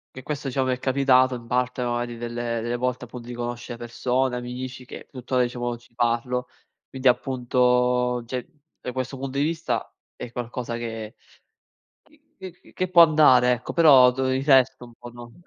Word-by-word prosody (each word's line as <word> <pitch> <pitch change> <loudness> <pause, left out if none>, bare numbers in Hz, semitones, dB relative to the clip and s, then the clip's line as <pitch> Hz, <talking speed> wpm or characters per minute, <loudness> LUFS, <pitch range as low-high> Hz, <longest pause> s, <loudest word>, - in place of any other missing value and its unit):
Che 130 - -8
questo, 145 -1 -4
diciamo, 130 0 0
mi 130 - +1
è - - -14
capitato 130 -1 +3
in 115 -1 -10
parte 125 +1 -1
magari 120 0 -3
delle 120 0 -3
delle 120 +1 -2
volte 125 0 -2
appunto 120 0 -10
di 120 - -6
conoscere 120 0 -5
persone, 125 +2 -1
amici 125 +1 -6
che - - -10
tuttora 125 -1 -1
diciamo 120 0 -2
ci 120 0 -23
parlo. 120 +1 -1 0.4
Quindi 130 0 -2
appunto, 125 -1 +1
cioè 125 +1 -5 0.3
da 125 - -5
questo 130 +1 -4
punto 135 +1 -4
di - - +2
vista 155 -7 -2 0.2
è 120 - -8
qualcosa 120 0 -5
che 115 0 -6 0.9
c - - -30 0.3
c 190 -1 -8
c 180 - -22
che 185 - -1
può 175 -1 +7
andare 145 -6 +5
ecco, 125 - -7
però 135 -7 +7
dov 130 +1 -1
il 130 +1 -1
resto 130 -2 +4
un 120 -1 -15
po' 120 - -11
non 120 0 -12
125 Hz, 180 wpm, -24 LUFS, 120-130 Hz, 0.9 s, può